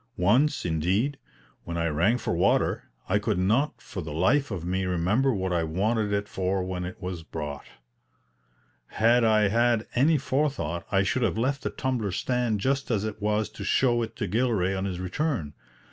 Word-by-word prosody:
Once, 125 Hz, -, +2 dB
indeed, 95 Hz, -, 0 dB, 0.4 s
when 85 Hz, 0 st, -5 dB
I 85 Hz, -, 0 dB
rang 85 Hz, +10 st, +2 dB
for -, -, -2 dB
water, -, -, +1 dB, 0.2 s
I 105 Hz, +2 st, +2 dB
could 105 Hz, -2 st, -1 dB
not 110 Hz, +11 st, +1 dB
for 95 Hz, -, -7 dB
the 80 Hz, -2 st, -7 dB
life 95 Hz, -, +2 dB
of 90 Hz, -6 st, -5 dB
me 95 Hz, +2 st, -1 dB
remember 95 Hz, +10 st, +1 dB
what 95 Hz, -5 st, -1 dB
I 85 Hz, -1 st, +1 dB
wanted 105 Hz, +6 st, 0 dB
it 100 Hz, 0 st, -1 dB
for 95 Hz, -1 st, -1 dB
when 90 Hz, -1 st, -4 dB
it 90 Hz, -, -7 dB
was 90 Hz, -2 st, -5 dB
brought. 75 Hz, -3 st, -6 dB, 1.2 s
Had 120 Hz, +2 st, +3 dB
I 110 Hz, -2 st, +4 dB
had 115 Hz, +1 st, +2 dB
any 150 Hz, +6 st, +4 dB
forethought 135 Hz, -, -1 dB
I 95 Hz, 0 st, +3 dB
should 125 Hz, +6 st, 0 dB
have 115 Hz, -, +1 dB
left 135 Hz, +4 st, 0 dB
the -, -, -2 dB
tumbler 125 Hz, -7 st, -2 dB
stand 120 Hz, +1 st, -1 dB
just 135 Hz, +4 st, 0 dB
as 110 Hz, -4 st, 0 dB
it 110 Hz, 0 st, -5 dB
was 105 Hz, +1 st, +1 dB
to 110 Hz, -, -9 dB
show 120 Hz, -2 st, +2 dB
it 115 Hz, -, -4 dB
to 110 Hz, -, -3 dB
Gilray 105 Hz, -3 st, +1 dB
on 95 Hz, 0 st, -2 dB
his 90 Hz, -2 st, -3 dB
return. 95 Hz, -, -2 dB
105 Hz, 185 wpm, -26 LUFS, 90-120 Hz, 1.2 s, I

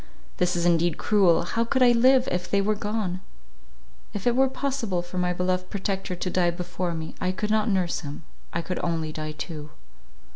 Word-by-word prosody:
This 180 Hz, 0 st, +1 dB
is 170 Hz, 0 st, 0 dB
indeed 170 Hz, -1 st, +3 dB
cruel 190 Hz, -6 st, +4 dB
—how 230 Hz, +6 st, 0 dB
could 255 Hz, +3 st, +2 dB
I 245 Hz, -, +7 dB
live, 255 Hz, +2 st, +5 dB
if 180 Hz, 0 st, -2 dB
they 200 Hz, -, +3 dB
were 205 Hz, +2 st, +2 dB
gone? 205 Hz, -3 st, -2 dB, 0.9 s
If 200 Hz, -, -4 dB
it 240 Hz, -1 st, +3 dB
were 265 Hz, +1 st, +4 dB
possible 255 Hz, -10 st, -2 dB
for 180 Hz, +1 st, -5 dB
my 180 Hz, 0 st, +1 dB
beloved 180 Hz, +1 st, -1 dB
protector 195 Hz, -2 st, -2 dB
to 180 Hz, -, -3 dB
die 175 Hz, -2 st, +3 dB
before 175 Hz, 0 st, -3 dB
me, 160 Hz, 0 st, -5 dB
I 185 Hz, -, +1 dB
could 210 Hz, +3 st, -2 dB
not 215 Hz, +1 st, +2 dB
nurse 185 Hz, -4 st, +1 dB
him; 145 Hz, 0 st, -7 dB, 0.3 s
I 170 Hz, -, -2 dB
could 180 Hz, -, -3 dB
only 165 Hz, -2 st, -1 dB
die 155 Hz, 0 st, -5 dB
too." 155 Hz, -1 st, -7 dB
185 Hz, 195 wpm, -26 LUFS, 175-210 Hz, 0.9 s, I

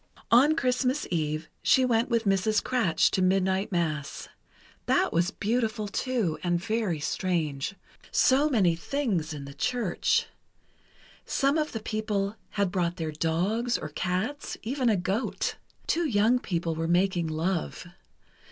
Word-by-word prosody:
On 275 Hz, +7 st, +6 dB
Christmas 255 Hz, 0 st, 0 dB
Eve, 155 Hz, -1 st, -1 dB
she 260 Hz, -, +4 dB
went 235 Hz, -1 st, +1 dB
with 230 Hz, -2 st, +1 dB
Mrs. 205 Hz, +1 st, +2 dB
Kratsch 230 Hz, -10 st, +2 dB
to 190 Hz, -, +1 dB
Midnight 190 Hz, +2 st, +1 dB
Mass. 155 Hz, -5 st, -2 dB, 0.6 s
That -, -, +2 dB
was 170 Hz, +2 st, +2 dB
beautiful, 220 Hz, 0 st, -1 dB
too, 220 Hz, -6 st, -1 dB
and 175 Hz, -1 st, +1 dB
very 215 Hz, -4 st, -1 dB
strange. 155 Hz, -1 st, -1 dB, 0.3 s
So 280 Hz, +3 st, +4 dB
many 190 Hz, -, +3 dB
things 190 Hz, -, -2 dB
in 145 Hz, -2 st, -6 dB
the 140 Hz, -, -9 dB
church. 230 Hz, -, 0 dB, 1.0 s
Some 275 Hz, +1 st, +1 dB
of 310 Hz, -1 st, 0 dB
the 225 Hz, -, -4 dB
people 215 Hz, -2 st, -2 dB
had 200 Hz, -3 st, 0 dB
brought 175 Hz, -3 st, 0 dB
their 160 Hz, -3 st, -3 dB
dogs, 185 Hz, +10 st, 0 dB
or 155 Hz, -, -6 dB
cats, 185 Hz, -, -3 dB
even 255 Hz, +2 st, 0 dB
a 215 Hz, -, +3 dB
goat. 195 Hz, +7 st, -2 dB, 0.3 s
Two 340 Hz, -1 st, +1 dB
young 230 Hz, +1 st, +3 dB
people 170 Hz, -6 st, -2 dB
were 165 Hz, +1 st, -2 dB
making 175 Hz, -1 st, +2 dB
love. 165 Hz, +3 st, -2 dB
195 Hz, 140 wpm, -27 LUFS, 170-235 Hz, 1.0 s, On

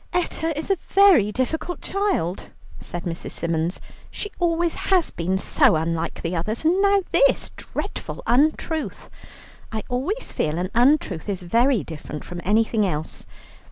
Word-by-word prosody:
"Etta 335 Hz, -2 st, 0 dB
is 315 Hz, +5 st, -2 dB
a 390 Hz, -, +3 dB
very 360 Hz, -, +5 dB
difficult 315 Hz, +9 st, -2 dB
child," 385 Hz, -, -1 dB, 0.3 s
said 175 Hz, 0 st, -6 dB
Mrs. 170 Hz, -1 st, -5 dB
Symons; 165 Hz, +1 st, -1 dB, 0.3 s
"she 415 Hz, -, -5 dB
always 340 Hz, -1 st, +1 dB, 0.2 s
has 370 Hz, -4 st, +3 dB
been 180 Hz, +3 st, -1 dB
so 190 Hz, -, +3 dB
unlike 165 Hz, +1 st, -2 dB
the 170 Hz, +1 st, -2 dB
others, 215 Hz, -, -2 dB
and 360 Hz, +4 st, +3 dB
now 400 Hz, -1 st, +4 dB
this -, -, +3 dB
dreadful -, -, -6 dB
untruth. 310 Hz, +3 st, 0 dB, 0.6 s
I 220 Hz, -1 st, -3 dB
always 290 Hz, -, -2 dB
feel 155 Hz, +1 st, -1 dB
an 180 Hz, +2 st, -2 dB
untruth 240 Hz, -, +2 dB
is 190 Hz, -3 st, -3 dB
very 235 Hz, +5 st, +2 dB
different 150 Hz, -2 st, -7 dB
from 175 Hz, 0 st, -7 dB
anything 220 Hz, +2 st, +2 dB
else. 160 Hz, -5 st, -3 dB
230 Hz, 145 wpm, -23 LUFS, -, 0.6 s, very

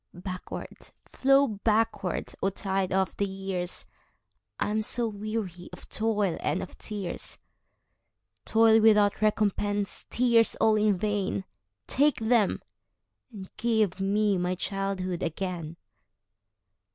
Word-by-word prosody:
Backward, 185 Hz, +1 st, -7 dB, 0.2 s
flow 275 Hz, +1 st, +4 dB
backward, 215 Hz, -3 st, -1 dB
O 195 Hz, -, +2 dB
tide 195 Hz, -1 st, -1 dB
of 190 Hz, 0 st, 0 dB
the 200 Hz, -, 0 dB
years!I 190 Hz, +1 st, -6 dB
am 215 Hz, +1 st, +1 dB
so 235 Hz, +2 st, +3 dB
weary 205 Hz, -4 st, -5 dB
of -, -, -12 dB
toil 210 Hz, -5 st, 0 dB
and -, -, -1 dB
of -, -, -10 dB
tears,—Toil 220 Hz, +2 st, -2 dB
without 210 Hz, -2 st, +4 dB
recompense, 205 Hz, -1 st, 0 dB
tears 235 Hz, -2 st, +3 dB
all 220 Hz, -1 st, +3 dB
in 210 Hz, -2 st, +2 dB
vain,—Take 100 Hz, -, -1 dB
them, 225 Hz, -3 st, +2 dB, 0.7 s
and 195 Hz, -4 st, -10 dB
give 220 Hz, -5 st, +1 dB
me 200 Hz, 0 st, +2 dB
my 180 Hz, +1 st, -1 dB
childhood 190 Hz, -2 st, -3 dB
again! 170 Hz, -1 st, -4 dB
205 Hz, 105 wpm, -27 LUFS, 185-220 Hz, 0.7 s, flow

